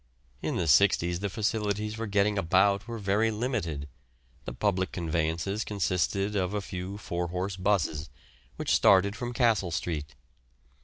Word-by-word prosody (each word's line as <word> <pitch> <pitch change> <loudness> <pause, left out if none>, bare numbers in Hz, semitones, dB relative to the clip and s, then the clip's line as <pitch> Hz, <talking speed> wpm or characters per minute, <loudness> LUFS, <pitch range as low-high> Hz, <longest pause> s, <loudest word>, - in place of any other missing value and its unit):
In - - -2
the 85 - 0
'sixties 85 +2 +4
the 100 +1 -2
facilities 105 0 -1
for 115 0 -4
getting 100 +1 +2
about 100 +4 +2
were 115 -1 -5
very 105 +2 +1
limited. 105 - -2 0.6
The - - -4
public 95 +5 0
conveyances 85 +4 -1
consisted 100 +1 -1
of 95 0 0
a - - +1
few 95 +1 -6
four 85 -4 -3
horse 90 +3 -3
'buses, 90 -6 0 0.5
which - - -1
started 100 +1 +5
from 120 +1 -4
Castle 115 -7 +2
Street. 75 -4 -3
100 Hz, 145 wpm, -28 LUFS, 85-105 Hz, 0.6 s, started